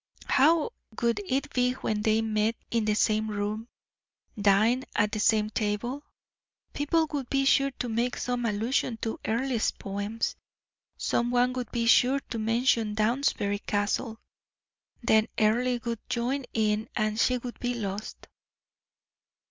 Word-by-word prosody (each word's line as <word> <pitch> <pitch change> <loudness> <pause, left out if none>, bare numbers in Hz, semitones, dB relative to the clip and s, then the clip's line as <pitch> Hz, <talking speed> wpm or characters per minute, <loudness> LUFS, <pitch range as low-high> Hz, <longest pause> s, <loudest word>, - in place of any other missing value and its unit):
How 310 +4 +4 0.3
would 235 -3 +1
it 275 +3 -1
be 250 0 +2
when 215 -4 -2
they 220 +1 +2
met 220 +1 +1 0.2
in 230 -2 +1
the 210 -1 +1
same 215 0 +1
room, 210 +2 -3 0.7
dined 215 +5 +3
at 210 0 +2
the 215 - -2
same 215 0 +2
table? 225 +7 -2 0.7
People 320 +3 +1
would 280 -4 -3
be 275 0 +1
sure 275 0 +4
to 245 - -3
make 235 +2 -1
some 245 -1 -1
allusion 225 +2 0
to 225 - -2
Earle's 235 0 0
poems, 205 +3 -3 0.6
some 235 0 0
one 245 +1 +2
would 250 -2 -4
be 235 -1 -1
sure 250 +4 +5
to 230 - -2
mention 225 -1 +1
Downsbury 215 -2 +1
Castle, 210 +3 -1 0.8
then 220 -1 +4
Earle 245 +4 +2
would 230 -2 -2
join 255 +3 -1
in 215 -1 0
and 215 0 0
she 250 +2 +3
would 245 0 -8
be 245 0 -1
lost. 205 -2 -5
230 Hz, 140 wpm, -28 LUFS, 215-250 Hz, 0.8 s, sure